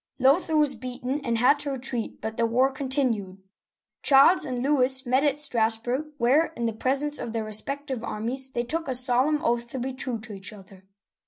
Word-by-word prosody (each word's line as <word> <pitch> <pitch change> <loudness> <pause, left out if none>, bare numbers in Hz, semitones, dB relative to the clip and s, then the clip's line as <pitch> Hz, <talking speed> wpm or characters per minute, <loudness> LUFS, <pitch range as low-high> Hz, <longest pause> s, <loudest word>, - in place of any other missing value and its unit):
Lothair 300 +5 +3
was 295 -2 +3
beaten 255 +3 -4
and 235 -3 -1
had 265 +5 +4
to 290 0 -4
retreat, 255 -3 -4
but 220 0 -4
the 230 0 +1
war 255 +4 +2
con 265 0 -5
tinued. 225 -9 0 0.6
Charles 280 +6 +5
and 250 -1 -3
Louis 265 -1 +2
met 255 +3 +2
at 290 -2 +2
Strassburg, 245 +3 0
where, 275 +6 +3
in 235 - -2
the 225 - -1
presence 275 +6 -1
of 230 - -5
their 225 -1 -2
respective 260 +4 -3
armies, 250 +6 -2
they 240 -2 -2
took 325 +6 -3
a 260 - -2
solemn 255 +4 +1
oath 235 0 0
to 250 - -7
be 260 +1 -3
true 255 -3 -4
to 220 -1 -9
each 200 +2 -8
other. 190 -2 -15
255 Hz, 195 wpm, -25 LUFS, 230-275 Hz, 0.6 s, Charles